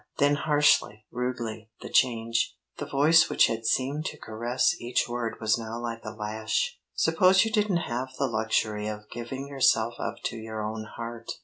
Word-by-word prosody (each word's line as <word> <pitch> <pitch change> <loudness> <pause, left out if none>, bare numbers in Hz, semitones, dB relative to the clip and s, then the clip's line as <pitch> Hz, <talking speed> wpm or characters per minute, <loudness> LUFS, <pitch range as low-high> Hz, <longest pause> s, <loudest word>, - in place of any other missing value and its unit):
Then 145 +1 +4
harshly, 145 -8 +2
rudely, 120 -3 -4
the - - -7
change; 115 -2 +1 0.2
the - - -4
voice 150 +4 +5
which - - +5
had 115 0 -2
seemed 140 +6 0
to - - -4
caress 120 +7 0
each 120 +1 0
word 120 -1 -3
was 110 +1 +1
now 115 +1 -5
like 115 -1 -5
a - - -5
lash. 110 - -2 0.2
"Suppose 190 +2 +4
you 225 - -2
didn't 205 -6 +1
have 125 +2 -3
the 140 - +1
luxury 110 -2 0
of 105 0 -7
giving 130 +4 -6
yourself 120 -4 +2
up - - -3
to 115 - -3
your 110 -1 -5
own 110 +1 -4
heart? 115 +1 -8
120 Hz, 175 wpm, -27 LUFS, 110-140 Hz, 0.2 s, voice